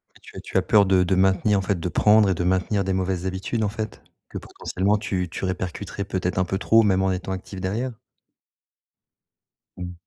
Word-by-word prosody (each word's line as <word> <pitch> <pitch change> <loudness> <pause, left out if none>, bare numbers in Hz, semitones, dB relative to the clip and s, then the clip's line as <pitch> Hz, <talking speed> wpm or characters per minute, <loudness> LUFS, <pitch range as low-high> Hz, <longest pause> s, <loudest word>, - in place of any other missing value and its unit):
Mais - - -20
tu - - -15
as - - -6
tu - - -6
as - - +2
peur 105 -2 +4
de 95 -1 +3
de 90 - +1
maintenir 95 +2 +3
en 95 - -1
fait, 95 -2 -1
de 90 - -2
prendre 105 +4 +4
et 95 - +2
de 90 - -2
maintenir 95 +2 +1
des 95 - -1
mauvaises 95 -1 -1
habitudes 95 +4 -2
en 105 - +1
fait? 110 0 -6 0.3
Que - - -11
potentiellement 100 +3 -1
tu 90 -4 -2
tu - - -5
répercuterais 95 +2 -4
peut-être 95 -2 -2
un 95 - +3
peu 95 +2 -2
trop 115 +3 +4
même 95 -3 +2
en 95 0 +1
étant 90 +1 -4
active 95 0 -7
derrière? 110 +7 -2 1.9
Mmh. 90 0 -5
95 Hz, 215 wpm, -23 LUFS, 95-100 Hz, 1.9 s, peur